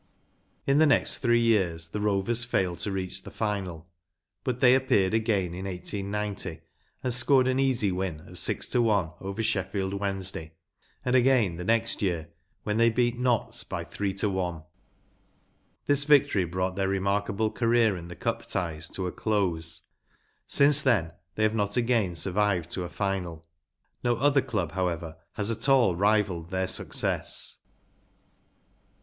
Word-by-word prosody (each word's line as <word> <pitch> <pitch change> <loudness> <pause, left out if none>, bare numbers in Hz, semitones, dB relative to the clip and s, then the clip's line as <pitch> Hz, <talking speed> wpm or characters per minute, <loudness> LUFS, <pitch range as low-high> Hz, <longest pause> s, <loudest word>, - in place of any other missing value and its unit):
In 140 +2 +3
the 160 - +6
next 145 - +2
ihree 120 -1 +4
years 95 -8 +1
the 105 +5 -4
Rovers 105 +3 +1
failed 95 -7 -1
to 100 - -2
reach 95 -1 -3
the - - -10
final, 95 -6 -3 0.6
but 125 -1 -2
they 125 -1 +6
appeared 120 -8 +2
again 105 -6 +1
in 95 +2 -6
1890 100 -2 -4 0.4
and 125 -2 +1
scored 130 +1 +4
an 130 0 +1
easy 125 -7 +2
win 90 -4 -3
of - - -2
six - - 0
to 125 - +2
one 100 -8 +2
over 100 +3 -4
Sheffield 95 -1 -1
Wednesday, 95 -5 -3 0.5
and 125 0 +2
again 120 -9 +3
the 90 - -5
next 115 +3 +1
year, 85 -5 -1 0.3
when 105 0 -1
they 115 0 +5
beat 120 +1 0
Notts 125 -3 +1
by - - -5
three 100 -1 -3
to 100 +2 0
one. 90 -5 -2 1.2
This 145 0 +3
victory 140 -10 +4
brought 90 +2 -2
their 95 0 0
rema 100 0 0
r 100 +1 +2
k - - -15
a - - -2
ble 110 +2 0
career 115 -3 +2
in 85 -1 -8
the 90 - -9
Cup 115 -1 -3
ties 80 -4 -2
to 95 - -4
a 90 - -2
close; 85 -7 -1 0.6
since 145 +1 +5
then 105 - +2 0.2
they 110 - 0
have 110 0 +3
not 105 -1 -1
again 115 -6 +1
sur¬ 90 +3 -1
vived 100 -5 +1
to 95 - -1
a 85 - -5
final. 90 -5 -3 0.6
No 120 -1 +2
other 140 +3 +3
club, 95 -10 -2
however, 85 -3 -3 0.2
has 105 +2 0
at 115 +4 -1
all 125 -10 +4
rivalled 100 -4 +1
their 95 +1 -1
success. 95 - -2
100 Hz, 165 wpm, -27 LUFS, 90-115 Hz, 1.2 s, the